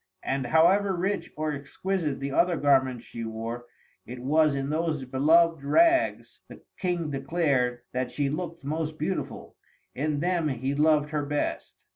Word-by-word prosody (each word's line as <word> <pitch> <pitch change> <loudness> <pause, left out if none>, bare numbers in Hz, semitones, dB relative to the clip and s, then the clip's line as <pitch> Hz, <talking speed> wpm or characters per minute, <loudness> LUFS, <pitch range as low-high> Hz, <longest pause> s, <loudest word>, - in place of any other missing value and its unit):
And, 135 -2 -1
however 185 +7 +4
rich 185 0 -2
or 155 0 -1
exquisite 150 +2 -3
the 140 0 -3
other 175 +4 +2
garments 130 -4 +2
she 115 - -7
wore, 115 +2 -5 0.4
it 125 - -8
was 150 +3 +2
in 135 +1 -2
those 155 -3 -1
beloved 155 +4 +3
rags, 330 - +2
the - - -13 0.2
King 175 -4 -1
declared, 135 -4 0
that 130 0 -2
she 140 +2 -1
looked 165 +2 -4
most 155 +1 -3
beautiful. 180 +5 -4 0.4
In 150 +1 -1
them 175 -1 0
he 130 0 -2
loved 150 0 +2
her 150 -2 -1
best. 145 +1 -3
150 Hz, 150 wpm, -27 LUFS, 135-165 Hz, 0.4 s, however